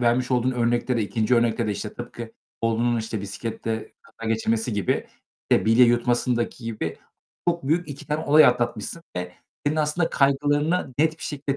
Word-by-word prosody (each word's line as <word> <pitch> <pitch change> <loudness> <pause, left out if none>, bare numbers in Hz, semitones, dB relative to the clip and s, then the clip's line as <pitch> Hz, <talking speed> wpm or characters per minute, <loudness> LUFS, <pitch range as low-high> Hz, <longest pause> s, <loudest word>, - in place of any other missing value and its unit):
vermiş 125 +1 +2
olduğun 125 0 +2
örnekte 120 0 +1
de 115 - +1
2. 110 +3 +1
örnekte 115 -1 +2
de, - - 0
işte, 105 +1 -5
tıpkı 120 -1 -7 0.3
oğlunun, 115 +1 +1
işte, 110 -1 -3
bisikletle 110 +2 -4
kaza 115 0 -8
geçirmesi 115 +1 0
gibi, 100 -2 0 0.4
işte, - - +4
bilye 115 +3 +6
yutmasındaki 120 0 +1
gibi 105 -8 -3 0.5
çok 170 -2 0
büyük 170 +3 +1
2 145 - -8
tane 150 +1 -2
olay 155 +2 +7
atlatmışsın 120 +5 0
ve 90 0 -4 0.3
senin 150 +2 +1
aslında 155 +2 +1
kaygılarını 145 +2 +1
net 160 +1 +2
bir - - -11
şekilde 140 -2 -3
120 Hz, 165 wpm, -24 LUFS, 115-145 Hz, 0.5 s, olay